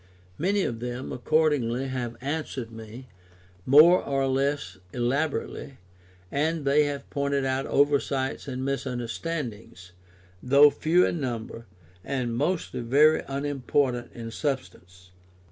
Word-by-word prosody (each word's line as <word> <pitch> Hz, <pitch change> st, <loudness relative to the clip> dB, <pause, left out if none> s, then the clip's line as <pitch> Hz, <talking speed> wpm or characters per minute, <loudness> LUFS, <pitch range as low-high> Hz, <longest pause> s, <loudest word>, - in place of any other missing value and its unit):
Many 195 Hz, +4 st, +1 dB
of 115 Hz, -2 st, -3 dB
them 125 Hz, +2 st, -5 dB
accordingly 135 Hz, -3 st, +1 dB
have 125 Hz, -3 st, -4 dB
answered 135 Hz, -4 st, -4 dB
me, 115 Hz, +3 st, -10 dB, 0.6 s
more 155 Hz, +7 st, +7 dB
or 135 Hz, -1 st, 0 dB
less 135 Hz, -8 st, -1 dB
elaborately, 135 Hz, +2 st, -2 dB, 0.5 s
and 155 Hz, +1 st, -1 dB
they 145 Hz, +2 st, +4 dB
have 140 Hz, -1 st, -4 dB
pointed 140 Hz, -1 st, 0 dB
out 130 Hz, +1 st, -1 dB
oversights 140 Hz, -1 st, +1 dB
and 130 Hz, -1 st, -4 dB
misunderstandings, 120 Hz, -, -4 dB, 0.5 s
though 140 Hz, +3 st, +6 dB
few 165 Hz, +5 st, +3 dB
in 170 Hz, -, -1 dB
number, 115 Hz, -2 st, -5 dB, 0.4 s
and 125 Hz, -4 st, -2 dB
mostly 160 Hz, +6 st, -1 dB
very 145 Hz, +6 st, +4 dB
unimportant 135 Hz, -2 st, -1 dB
in 115 Hz, -1 st, -7 dB
substance. 90 Hz, -, -5 dB
135 Hz, 110 wpm, -26 LUFS, 120-145 Hz, 0.6 s, more